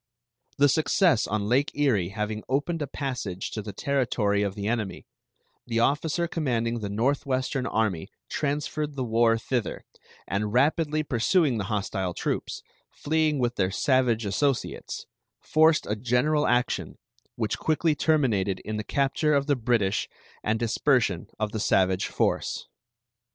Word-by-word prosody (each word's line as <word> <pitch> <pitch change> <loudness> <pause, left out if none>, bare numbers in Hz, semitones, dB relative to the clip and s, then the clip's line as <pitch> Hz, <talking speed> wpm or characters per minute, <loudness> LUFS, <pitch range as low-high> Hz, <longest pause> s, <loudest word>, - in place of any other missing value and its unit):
The 145 - +5
success 155 - +3
on 105 -1 -1
Lake 130 +5 +2
Erie 120 -12 +2
having 105 +1 -3
opened 145 +5 0
a 145 - -2
passage 125 -10 -4
to 110 - -4
the 105 0 -6
territory 115 -4 0
of 100 -2 -1
the 100 -1 -4
enemy, 110 -4 -2 0.6
the 115 -1 0
officer 150 +7 +1
commanding 120 -8 -1
the 105 -2 -4
Northwestern 130 +3 0
army 105 -7 -1 0.2
transferred 150 0 -2
the 130 - -2
war 115 -1 +3
thither, 120 0 -3 0.4
and 105 +2 -1
rapidly 155 +4 +2
pursuing 135 - +2
the 100 - -2
hostile 95 -3 -2
troops, - - -3 0.3
fleeing 155 -1 0
with 120 -2 -1
their 95 -2 +2
savage 120 0 +2
associates, 135 +7 -1 0.3
forced 160 0 +3
a 105 - -1
general 125 +7 +1
action, 125 0 0 0.4
which - - -2
quickly 160 0 +1
terminated 125 - +1
in 110 0 -4
the 105 - -3
capture 140 +5 +1
of 140 0 +2
the 145 -1 +2
British 110 -5 0 0.3
and 110 +1 +1
dispersion 115 - +1
of 110 -1 -2
the 110 - -3
savage 95 -2 +2
force. - - -1
120 Hz, 140 wpm, -26 LUFS, 105-145 Hz, 0.6 s, The